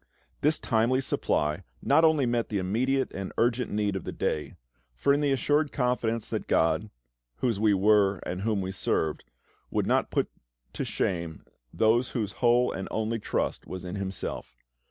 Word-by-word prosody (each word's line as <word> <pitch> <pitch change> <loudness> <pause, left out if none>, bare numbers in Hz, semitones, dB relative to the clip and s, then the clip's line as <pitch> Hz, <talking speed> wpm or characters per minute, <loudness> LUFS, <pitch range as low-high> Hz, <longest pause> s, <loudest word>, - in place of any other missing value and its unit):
This 155 +2 +3
timely 115 +3 +2
supply 75 - 0 0.2
not 160 - +3
only 155 -4 +4
met 120 -1 0
the 105 - -1
immediate 125 +8 0
and 95 -1 -5
urgent 120 +1 +1
need 105 -1 0
of 95 - -3
the - - -5
day; 75 - -2 0.4
for 140 - +3
in 145 - +1
the 145 -1 +2
assured 145 +3 +2
confidence 120 -3 0
that - - -3
GOD, 80 +6 +2 0.5
whose 115 - -1
we 105 -1 +4
were 100 0 +4
and 90 +1 -3
whom 105 -1 0
we 95 0 -3
served, 80 -4 -1 0.5
would - - 0
not - - +2
put - - 0 0.5
to - - -3
shame 85 -4 -2 0.3
those 115 +3 +2
whose 105 -3 -1
whole 120 0 +4
and 95 - -5
only 110 +1 -1
trust - - -2
was 95 0 -6
in 90 - -5
Himself. 100 -2 -5
110 Hz, 170 wpm, -28 LUFS, 95-125 Hz, 0.5 s, only